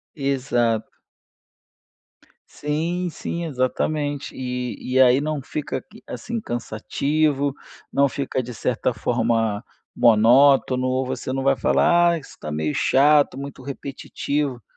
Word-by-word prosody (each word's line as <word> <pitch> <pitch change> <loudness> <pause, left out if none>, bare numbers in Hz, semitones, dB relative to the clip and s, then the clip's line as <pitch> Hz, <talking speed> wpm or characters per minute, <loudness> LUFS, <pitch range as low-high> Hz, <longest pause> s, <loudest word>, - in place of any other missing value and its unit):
Exato. 125 -6 0 1.6
Sim, 170 +4 -2
sim, 170 +1 -5
exatamente. 145 +1 -2
E, 125 -1 -4 0.2
e 130 - +5
aí 130 0 +6
não 150 -2 -2
fica, 135 -1 -4 0.2
assim, 235 -1 -4
cansativo, 140 - -1 0.4
não 140 0 +3
fica 135 -1 -3
de 120 0 -7
certa 125 +2 -1
forma 115 -2 0 0.3
monótono, 130 +3 +5
ou 130 +1 0
você 130 0 -4
não 135 0 -2
vai 135 0 +3
falar: 175 +8 +3
"Ah, - - 0
isso 150 - -11
está 75 - -8
meio 75 0 -1
chato, 145 -1 +4
muito 140 -1 -7
repetitivo". 140 -1 -3
135 Hz, 120 wpm, -22 LUFS, 125-145 Hz, 1.6 s, aí